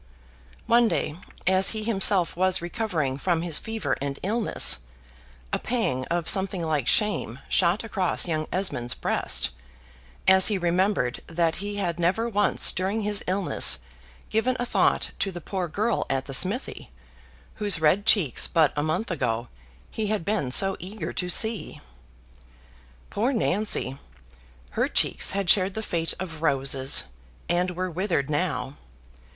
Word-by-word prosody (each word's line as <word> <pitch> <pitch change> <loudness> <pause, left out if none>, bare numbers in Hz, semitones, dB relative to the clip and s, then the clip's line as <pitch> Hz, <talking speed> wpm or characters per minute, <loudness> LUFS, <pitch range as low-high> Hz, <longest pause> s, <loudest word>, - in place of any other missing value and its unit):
One 235 0 +4
day, 150 - -2 0.3
as 190 +1 +4
he 215 - -3
himself 195 -4 +3
was 185 +1 +2
recovering 170 - -3
from 170 0 0
his 170 -3 -1
fever 220 - -3
and 140 0 -4
illness, 210 - +2 0.7
a - - +1
pang 175 - -2
of 170 +2 -2
something 190 -2 +2
like 150 -6 -1
shame 205 - +1
shot 180 +4 +1
across 195 -5 0
young 155 -2 -2
Esmond's 125 -11 -1
breast, - - +1 0.8
as 190 0 +7
he 210 - +1
remembered 175 -6 0
that 165 0 -1
he 205 +1 -5
had 175 -4 -3
never 185 +7 0
once 205 -2 +3
during 195 +4 -2
his 205 0 0
illness 190 0 +3 0.5
given 245 +4 0
a 245 - -1
thought - - +1
to 195 - -1
the 175 - -7
poor 180 +2 -4
girl 210 +7 -1
at 135 0 -1
the 135 - -7
smithy, 195 - 0 0.7
whose 205 -5 +2
red 180 +7 +2
cheeks 165 - +3
but 160 -4 +2
a 145 - -1
month 155 +8 -2
ago 120 -6 -2 0.4
he 220 -1 -3
had 210 -5 -2
been 205 -10 -1
so 195 +8 +4
eager 195 +5 -6
to 180 - -3
see. 220 +4 +2 1.3
Poor 230 +6 0
Nancy! 205 - 0 0.7
her - - 0
cheeks - - +2
had 200 -2 -2
shared 185 +2 +3
the 220 - -4
fate 165 -4 -1
of 165 -4 -7
roses, 135 -2 +2 0.4
and 180 +1 0
were 185 +1 -3
withered 165 -5 -2
now. 145 -4 -2
185 Hz, 145 wpm, -25 LUFS, 155-205 Hz, 1.3 s, as